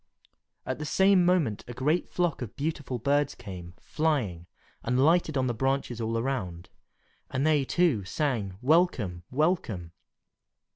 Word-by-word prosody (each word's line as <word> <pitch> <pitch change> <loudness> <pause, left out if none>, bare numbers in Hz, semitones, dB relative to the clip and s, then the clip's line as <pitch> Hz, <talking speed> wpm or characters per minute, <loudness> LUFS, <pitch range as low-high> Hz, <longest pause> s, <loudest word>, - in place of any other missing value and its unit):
At - - -3
the 150 - -4
same 190 +3 +4
moment 175 - +2
a 120 - -7
great 150 +7 0
flock 175 -6 -1
of 115 -4 -6
beautiful 145 -4 -3
birds 140 +3 +1
came, 90 -2 -9
flying, 120 - -1 0.3
and 125 +2 0
lighted 155 +1 +3
on 130 - +1
the 120 - 0
branches 135 -1 -1
all 115 0 -1
around, 105 -9 -3 0.6
and 130 +2 -1
they, 155 -3 +3
too, 145 - +2
sang, 110 - -2
"Welcome! 130 - +2
welcome!" 125 - 0
135 Hz, 140 wpm, -28 LUFS, 110-155 Hz, 0.6 s, same